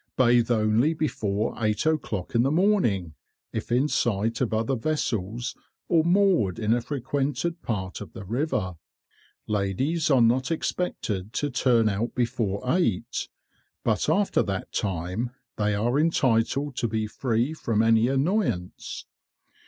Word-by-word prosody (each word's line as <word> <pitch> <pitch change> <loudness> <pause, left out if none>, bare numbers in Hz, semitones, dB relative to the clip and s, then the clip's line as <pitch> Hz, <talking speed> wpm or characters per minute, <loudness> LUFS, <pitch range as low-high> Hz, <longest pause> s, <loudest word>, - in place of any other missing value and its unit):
Bathe 120 -2 +4
only 115 +7 +2
before 110 -9 -1
eight 105 +4 +1
o'clock 135 - -1
in 115 - +4
the 130 - +2
morning, 150 - +2 0.4
if 110 +1 -4
in 130 +5 +3
sight 115 -3 0
of 125 - +1
other 110 +4 0
vessels 120 -4 -2 0.4
or 165 -2 +4
moored 175 - +3
in 110 -1 +1
a 120 - +1
frequented 145 +5 -2
part 95 -5 -4
of - - -9
the 100 - -8
river. 105 - -1 0.7
Ladies 110 - 0
are 135 -3 +5
not 125 +3 +2
expected 110 - -2
to 145 +5 -1
turn 120 -3 +3
out 105 +3 -1
before 115 -5 -1
eight, 130 - 0 0.5
but - - +1
after - - +2
that - - -3
time 95 +5 -2 0.3
they 105 -1 +1
are 120 +7 +1
entitled 140 -2 +1
to 120 - +1
be 110 -1 -1
free 120 +5 -1
from 115 -8 0
any 115 +1 +4
annoyance. 135 - -1
120 Hz, 135 wpm, -26 LUFS, 105-145 Hz, 0.7 s, are